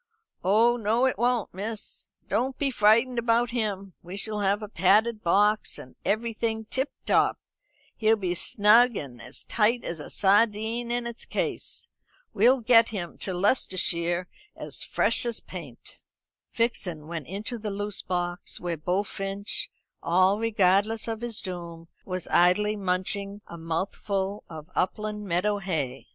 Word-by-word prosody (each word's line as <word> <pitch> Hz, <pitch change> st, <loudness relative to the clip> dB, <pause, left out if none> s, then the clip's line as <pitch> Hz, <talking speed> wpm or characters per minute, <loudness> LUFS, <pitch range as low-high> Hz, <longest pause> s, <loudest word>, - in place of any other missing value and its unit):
"Oh 225 Hz, +6 st, +4 dB
no 225 Hz, +3 st, +2 dB
it 260 Hz, -, +1 dB
won't, 240 Hz, -2 st, +1 dB
miss. 210 Hz, +3 st, -6 dB, 0.2 s
Don't 260 Hz, +1 st, -1 dB
be 275 Hz, -2 st, +1 dB
frightened 235 Hz, +2 st, +3 dB
about 235 Hz, 0 st, +2 dB
him. 200 Hz, -5 st, -2 dB
We 180 Hz, +3 st, -8 dB
shall 210 Hz, +1 st, -1 dB
have 205 Hz, +1 st, +1 dB
a -, -, -5 dB
padded 210 Hz, +4 st, +2 dB
box, 210 Hz, +4 st, +2 dB
and 125 Hz, -, -12 dB
everything 220 Hz, 0 st, -1 dB
tip 265 Hz, +5 st, -1 dB, 0.2 s
top. -, -, +3 dB, 0.6 s
He'll 220 Hz, 0 st, +4 dB
be 190 Hz, -5 st, -3 dB
as 180 Hz, -, 0 dB
snug 225 Hz, +3 st, +5 dB
and 125 Hz, -4 st, -7 dB
as 125 Hz, +3 st, -5 dB
tight 230 Hz, +2 st, +1 dB
as 170 Hz, -, -4 dB
a 150 Hz, -, -8 dB
sardine 220 Hz, +3 st, +2 dB
in 240 Hz, 0 st, -1 dB
its 235 Hz, -1 st, -6 dB
case. -, -, -3 dB, 0.5 s
We'll 255 Hz, +1 st, +4 dB
get 230 Hz, 0 st, +5 dB
him 180 Hz, -6 st, -6 dB
to 190 Hz, -, -3 dB
Leicestershire 180 Hz, -3 st, +1 dB, 0.3 s
as -, -, -4 dB
fresh 230 Hz, +2 st, +2 dB
as 235 Hz, -2 st, -1 dB
paint." 155 Hz, -10 st, -10 dB, 0.5 s
Vixen 180 Hz, -9 st, -1 dB
went 160 Hz, -3 st, -6 dB
into 215 Hz, +6 st, -5 dB
the 210 Hz, 0 st, -4 dB
loose 205 Hz, 0 st, -4 dB
box, 175 Hz, -1 st, -3 dB
where 175 Hz, -2 st, -3 dB
Bullfinch, 195 Hz, +4 st, 0 dB, 0.3 s
all 185 Hz, +4 st, +3 dB
regardless 215 Hz, 0 st, +2 dB
of 225 Hz, -1 st, -4 dB
his 235 Hz, -3 st, -2 dB
doom, 170 Hz, -3 st, -7 dB, 0.2 s
was 185 Hz, -2 st, -4 dB
idly 195 Hz, +5 st, +3 dB
munching 200 Hz, +1 st, -2 dB
a -, -, -10 dB
mouthful 190 Hz, +4 st, -3 dB
of 160 Hz, +1 st, -10 dB
upland 210 Hz, +2 st, -2 dB
meadow 200 Hz, +4 st, +1 dB
hay. 150 Hz, -9 st, -3 dB
205 Hz, 145 wpm, -26 LUFS, 180-225 Hz, 0.6 s, snug